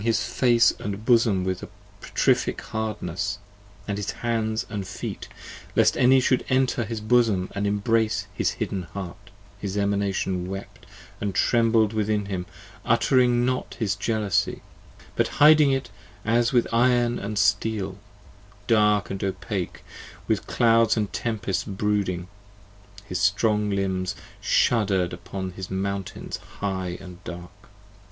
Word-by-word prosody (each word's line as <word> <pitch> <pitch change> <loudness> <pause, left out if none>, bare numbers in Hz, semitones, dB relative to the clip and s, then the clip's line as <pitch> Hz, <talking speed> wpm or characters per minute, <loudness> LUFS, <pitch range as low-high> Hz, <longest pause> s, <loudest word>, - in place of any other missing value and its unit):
38 110 - -4
HIS 115 - +2
face 120 -2 +4
and 105 +1 -5
bosom 115 -6 +4
with 95 0 -2 0.4
petrific - - +1
hardness, 100 -4 -3 0.5
and 100 -1 -2
his 105 - -3
hands 110 -2 -1
And 100 -3 -5
feet, 95 - -6 0.5
lest - - +4
any 130 +1 +5
should 130 0 +2
enter 130 -3 +2
his 115 0 -4
bosom 110 -4 +2
& - - -16
embrace 105 +1 +1
His - - 0
hidden 95 - -3
heart: 95 -4 -7 0.3
his 100 0 -4
Emanation 100 -2 0
wept 95 +1 -8 0.3
& 100 -2 -1
trembled 115 0 +3
within 105 -1 0
him: 95 -3 -4 0.4
Uttering 120 +1 +3
not 130 0 -2
his 105 -4 -1
jealousy, 105 -2 0 0.5
but - - +2
hiding 150 -1 +7
it 135 -4 -2 0.3
as 115 +1 +2
with 120 -2 +3
5 120 +2 +4
Iron 120 -1 +1
and 105 +1 -4
steel, 100 -1 +1 0.7
dark 105 -3 +3
and 95 - -3
opake, 95 0 -3 0.4
with - - 0
clouds 115 -1 +3
& - - -24
tempests 105 -5 -2
brooding: 95 -3 -1 0.8
His 90 -3 -3
strong 105 +2 +2
limbs 95 -2 -1 0.2
shudder'd 95 -6 +2
upon 95 -1 -6
his 95 +1 -7
mountains 95 0 -4 0.2
high 95 -3 -3
and 90 -1 -12
dark. 90 0 -8
105 Hz, 130 wpm, -25 LUFS, 95-115 Hz, 0.8 s, hiding